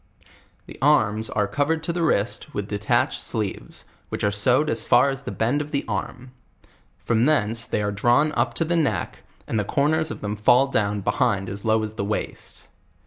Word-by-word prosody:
The - - -12
arms 110 -7 +2
are 105 -1 0
covered 155 +6 -1
to 170 - -2
the 175 - -2
wrist 150 -1 -1
with 105 -1 -3
de 105 -1 -4
tatched 105 - +1
sleeves, 105 -4 -4 0.2
which - - -4
are 105 - +2
sewed 125 +9 +3
as - - 0
far 140 - +4
as 135 0 -5
the - - -6
bend 125 +6 0
of 150 - -6
the 140 -2 -2
arm; 125 +4 -5 0.7
from 115 -1 0
tiseiice 115 -6 0
they 105 - -1
are 105 - -1
drawn 120 +9 +2
up - - -1
to 165 - 0
the 170 +2 0
neck, 160 -4 -1 0.3
and 110 - -1
the - - 0
cor 140 +8 +1
ners 160 0 0
of - - -7
them 105 0 -3
fall 125 +6 +3
duwa 100 -1 0
behind 100 -5 0
as 100 +1 -7
low 110 0 +2
as 105 0 -4
the - - -1
waist. 105 +2 -4
115 Hz, 205 wpm, -23 LUFS, 105-145 Hz, 0.7 s, far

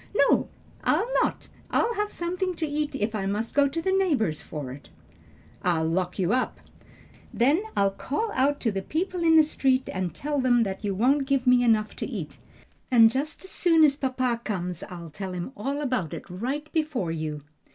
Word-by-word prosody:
"No, - - +3 0.3
I'll - - +2 0.2
not. - - -1 0.2
I'll 470 - +1
have 420 -1 -2
something 360 +1 -2
to 325 - -2
eat 295 -1 -2
if 220 -4 -1
I 195 -3 -2
must 210 +3 -2
go 285 0 +4
to 315 +4 -3
the 380 - +1
neighbors 290 - +1
for 145 -5 -6
it." 135 +2 -11 0.7
"I'll 165 -3 +1
lock 180 +2 -1
you 190 +2 +1
up." 255 0 0 0.7
"Then 280 +10 +3 0.2
I'll 200 0 +3
call 420 - -3
out 285 0 +1
to 225 - +1
the 195 -1 -2
people 355 - -2
in 325 -1 +5
the 315 - +8
street 265 -3 +1
and 185 -2 -2
tell 290 -1 -1
them 245 -2 +3 0.2
you 200 -3 -2
won't 270 +6 +2
give 275 -2 +1
me 250 -1 +5
enough 220 -2 +2
to - - -3
eat. - - -6 0.5
And 230 -3 +7
just 290 +7 -3
as 380 - -6
soon 330 -3 +4
as 285 -2 +5
papa 255 -4 -1
comes 180 -5 -3
I'll 170 -3 -8
tell 190 +4 -5
him 180 +7 -5
all 275 +5 -3
about 250 - -1
it - - -9
right 255 +12 -4
before 300 - -1
you." 155 -2 -4
255 Hz, 195 wpm, -26 LUFS, 195-300 Hz, 0.7 s, the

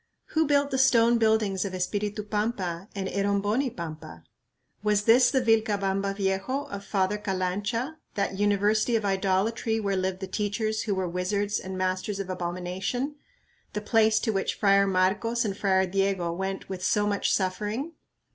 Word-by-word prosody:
Who 315 -1 +1
built 285 0 +2
the 265 - 0
stone 235 -2 +5
buildings 220 -4 +2
of 195 -2 -4
Espiritu 205 +3 -2
Pampa 205 -4 -2
and 195 -1 -2
Eromboni 205 +6 0
Pampa? 155 - -7 0.6
Was 210 -1 +2
this 245 +3 +6
the 265 -1 +2
"Vilcabamba 200 -4 +1
Viejo" 195 +7 -1
of 200 0 -5
Father 200 +1 0
Calancha, 205 +8 -2 0.2
that 200 -1 -1
"University 205 +3 +2
of 220 -2 0
Idolatry 200 +4 0
where 200 -2 -1
lived 185 0 -1
the 190 - -4
teachers 215 +2 -1
who 205 -3 -1
were 190 -1 -1
wizards 200 +4 -1
and 190 0 -6
masters 185 +2 -1
of 190 -1 -4
abomination," 185 - -3 0.6
the 210 - -2
place 220 0 +3
to 225 - 0
which 195 - -1
Friar 200 -1 +4
Marcos 195 +6 +1
and 200 -2 -2
Friar 190 -2 +2
Diego 190 -2 0
went 190 +2 -4
with 185 -1 -6
so 205 +2 +2
much 205 -1 0
suffering? 210 - -1
200 Hz, 155 wpm, -27 LUFS, 190-220 Hz, 0.6 s, this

